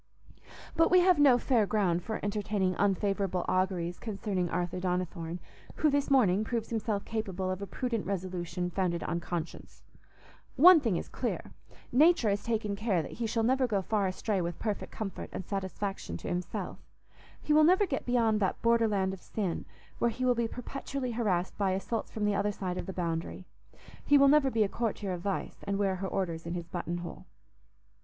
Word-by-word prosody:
But 330 - +4
we 365 0 +6
have 360 -3 +4
no 275 -4 +7
fair 235 -4 +2
ground 185 -5 +1
for 220 +5 -4
entertaining 205 -2 0
unfavourable 195 -2 +1
auguries 185 -2 0
concerning 195 -5 -2
Arthur 175 +1 -2
Donnithorne, 180 -2 -2 0.4
who 305 -2 +2
this 285 0 +1
morning 215 -8 +4
proves 230 0 -3
himself 215 -3 -1
capable 195 -4 -2
of 185 +1 -4
a 200 - -4
prudent 235 -5 -3
resolution 180 -2 -3
founded 175 -2 -1
on 170 - -2
conscience. 170 -1 -6 0.7
One 345 +4 +9
thing 225 - 0
is - - -4
clear: - - -4 0.4
Nature 295 -4 +5
has 200 0 -1
taken 215 -3 -1
care 200 -5 0
that - - -8
he 230 -1 -3
shall 225 0 0
never 260 +2 +2
go 200 -4 0
far 205 0 +1
astray 190 +1 -1
with 170 -1 -3
perfect 210 -3 -3
comfort 205 -3 -5
and 185 - -5
satisfaction 195 - -4
to - - -8
himself; 180 0 -4 0.6
he 300 - 0
will 310 +1 +6
never 370 +6 +5
get 275 -7 -3
beyond 230 -3 +2
that 190 -3 0
border 230 -1 +4
land 190 -2 0
of 190 - -9
sin, 195 -6 -3 0.3
where 235 - +3
he 250 +3 -3
will 250 - +4
be 235 -1 0
perpetually 255 +1 -5
harassed 195 -6 0
by 195 -2 +2
assaults 195 +4 -3
from 215 -1 -2
the 210 - +2
other 200 +1 +1
side 185 -3 -4
of - - -6
the - - -3
boundary. 170 0 -3 0.6
He 290 - +5
will 275 0 +6
never 290 -2 +5
be 225 -4 +2
a - - +1
courtier 210 -2 -2
of 175 - -5
Vice, 195 +1 -3
and 200 0 -1
wear 195 -2 +1
her 190 +1 -3
orders 170 -4 -3
in 170 - -3
his 170 -1 -5
button 175 -1 -3
hole. - - -9
200 Hz, 190 wpm, -30 LUFS, 185-235 Hz, 0.7 s, One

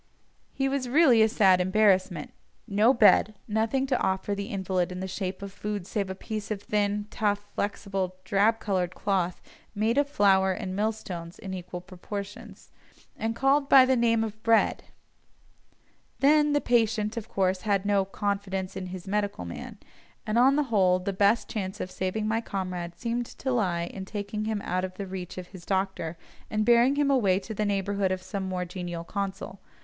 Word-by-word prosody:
Here 270 0 -1
was 265 -3 -2
really 260 -5 +5
a 220 - +5
sad 190 -4 +4
embarrassment—no 195 - +1
bed; 215 -3 +5
nothing 225 +5 0
to 260 -2 0
offer 190 +2 0
the 200 0 -4
invalid 190 -2 -1
in 180 - -5
the 190 - -3
shape 190 +1 -4
of 200 - -6
food 205 -3 -4
save 200 0 -2
a 190 - -4
piece 215 +1 -5
of 205 -2 -4
thin, 205 0 0
tough, 205 -2 0
flexible, 195 -2 -2
drab 205 +4 +2
coloured 185 -4 -1
cloth, 185 -3 -1 0.3
made 225 +6 +2
of 285 0 +1
flour 190 -6 +3
and 185 -1 -5
mill 215 +2 +1
stones 175 -6 -8
in 190 -3 -7
equal 180 -1 -6
proportions, 195 +2 -8 0.4
and 225 +1 -2
called 275 +3 +2
by 265 -2 +8
the 260 0 +3
name 230 -2 +2
of 220 0 -6
"bread"; 225 0 +2 1.3
then 295 +1 +4
the 290 - +2
patient, 225 -2 +1
of 230 -1 -6
course, 185 -1 0
had 200 -2 0
no 200 -1 +3
"confidence 195 -1 -3
in 185 - -5
his 185 0 -8
medical 200 - -1
man," 85 - -8 0.5
and 215 +2 +1
on 265 +3 +5
the 295 - +2
whole, 185 -3 +4
the 185 +2 -3
best 205 +4 +3
chance 195 -1 -4
of 185 - -4
saving 190 +4 -2
my 225 +1 0
comrade 180 -5 -4
seemed 235 0 -2
to 265 - -4
lie 185 -8 +1
in 190 +2 -7
taking 210 +1 -4
him 215 -2 -2
out 185 +1 -1
of 185 0 -5
the 200 - -5
reach 185 -1 -7
of 180 -1 -7
his 185 -3 -11
doctor, 190 -3 -2 0.3
and 215 0 0
bearing 240 +3 +5
him 285 -1 +2
away 200 -9 +3
to 220 +3 -6
the 210 0 -1
neighbourhood 200 -1 0
of 185 0 -3
some 195 -2 -4
more 180 -1 -2
genial 175 -1 -5
consul. 195 +1 -5
200 Hz, 185 wpm, -27 LUFS, 185-220 Hz, 1.3 s, by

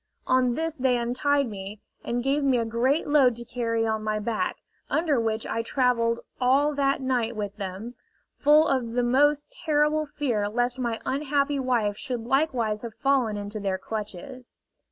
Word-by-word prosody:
On 255 -2 +2
this 325 +1 -1
they 260 -4 +1
untied 260 +4 +1
me, 200 -1 -7 0.2
and 240 +1 -2
gave 280 +2 +1
me 265 -2 +3
a 230 - 0
great 245 +7 +1
load 275 -5 +4
to 235 +1 -8
carry 230 -2 -1
on 220 -1 -1
my 215 0 -1
back, 215 +1 -2 0.3
under 310 -5 +1
which 225 -1 -1
I 230 - -2
travelled 235 -1 +1 0.2
all 275 +4 +3
that 275 -1 +1
night 245 -3 0
with 205 -1 -4
them, 200 +4 -6 0.5
full 300 +2 +5
of 240 -4 0
the 245 0 +1
most 290 +4 +2
terrible 305 -1 +2
fear 245 -9 -1
lest 245 +3 -1
my 235 -3 -2
unhappy 280 0 0
wife 235 -6 0
should 250 -3 -3
likewise 240 -6 0
have 230 -2 -7
fallen 265 -6 +1
into 205 +1 -5
their 195 -2 -1
clutches. 220 +5 -7
245 Hz, 170 wpm, -26 LUFS, 225-275 Hz, 0.5 s, full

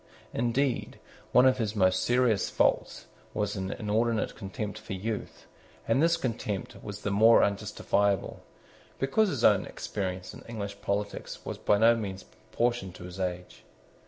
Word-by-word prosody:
Indeed 120 +2 0 0.3
one 125 - +6
of 130 -1 +4
his 110 -2 -1
most 95 -2 +3
serious 120 -4 +2
faults - - +1 0.3
was 105 -1 -1
an 95 -1 -3
inordinate 110 +1 0
contempt 105 +1 -5
for 105 -1 -7
youth: 105 +3 -5 0.4
and 115 +5 +3
this 170 +1 +4
contempt 110 - -3
was 105 0 -7
the 100 - -1
more 110 +3 +6
unjustifiable, 100 -1 0 0.6
because 200 +11 +2
his - - -3
own - - +5
experience 95 -2 -4
in - - -11
English 100 -3 -6
politics 100 +1 -3
was - - -5
by 105 - +3
no 115 +2 +6
means 100 -4 -5
proportioned 110 -3 -3
to 90 - -10
his 90 +1 -9
age. 90 -1 -4
105 Hz, 150 wpm, -29 LUFS, 100-115 Hz, 0.6 s, one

